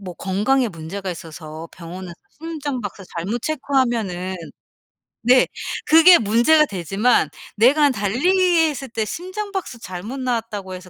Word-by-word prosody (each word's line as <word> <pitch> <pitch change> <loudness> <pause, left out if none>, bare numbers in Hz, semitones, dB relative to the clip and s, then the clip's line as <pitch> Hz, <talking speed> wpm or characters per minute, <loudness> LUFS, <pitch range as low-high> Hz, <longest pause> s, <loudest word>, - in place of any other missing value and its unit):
뭐 185 -3 -7
건강에 220 +9 +1
문제가 185 +2 -6
있어서 160 -1 -8
병원에서 175 +1 -9 0.3
심장 295 -5 -4
박수 205 -1 -7
잘못 200 +8 -2
체크하면은 235 - -1 0.9
네. 250 +2 +5 0.4
그게 330 +3 +8
문제가 240 +9 +4
되지만 195 - +1 0.3
내가 285 +7 +5
달리기했을 300 - +1
때 225 -1 -2
심장 375 - -5
박수 345 -11 -5
잘못 200 +8 -7
나왔다고 225 -6 -3
해서 180 0 -11
230 Hz, 300 characters per minute, -21 LUFS, 185-290 Hz, 0.9 s, 그게